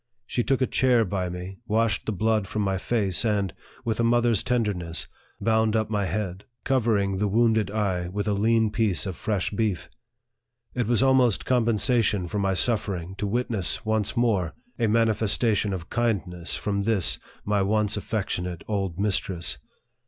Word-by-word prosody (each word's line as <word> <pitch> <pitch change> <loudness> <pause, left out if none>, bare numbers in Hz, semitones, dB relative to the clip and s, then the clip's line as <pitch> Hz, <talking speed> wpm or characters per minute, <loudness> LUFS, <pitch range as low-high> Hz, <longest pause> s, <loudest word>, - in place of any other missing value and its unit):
She 120 - -1
took 135 +1 +1
a - - +4
chair 125 -3 +3
by 95 -1 -2
me, 90 +2 -7
washed 110 -2 +1
the - - +1
blood 110 0 0
from 105 +1 -2
my 95 -1 0
face, 100 -4 +1
and, 100 -5 0 0.3
with 115 -1 -1
a - - +2
mother's 120 -2 +3
tenderness, 100 -9 -2 0.3
bound 110 -1 +2
up 110 -1 0
my 100 -3 0
head, 95 0 -3 0.2
covering 110 -7 +1
the 105 - +1
wounded 110 0 +2
eye 100 -4 -1
with 100 +4 -3
a 105 - +2
lean 110 +1 +2
piece 110 -4 +1
of 95 -3 -4
fresh 100 -1 -2
beef. 105 -4 -2 0.8
It 120 -3 -1
was 120 0 +3
almost 130 -4 +3
compensation 115 -5 +2
for 105 - -3
my 95 -1 +1
suffering 95 -5 0
to 105 - -1
witness, 115 -1 -1
once 110 +1 0
more, 105 -8 +1 0.2
a 115 - +2
manifestation 110 -1 +2
of 90 -4 -6
kindness 100 -7 -1
from 100 -1 -1
this, 100 -3 +1 0.3
my 105 -1 +1
once 105 +1 +1
affectionate 90 -5 -3
old 95 -4 -2
mistress. 90 -8 -1
105 Hz, 160 wpm, -25 LUFS, 95-115 Hz, 0.8 s, a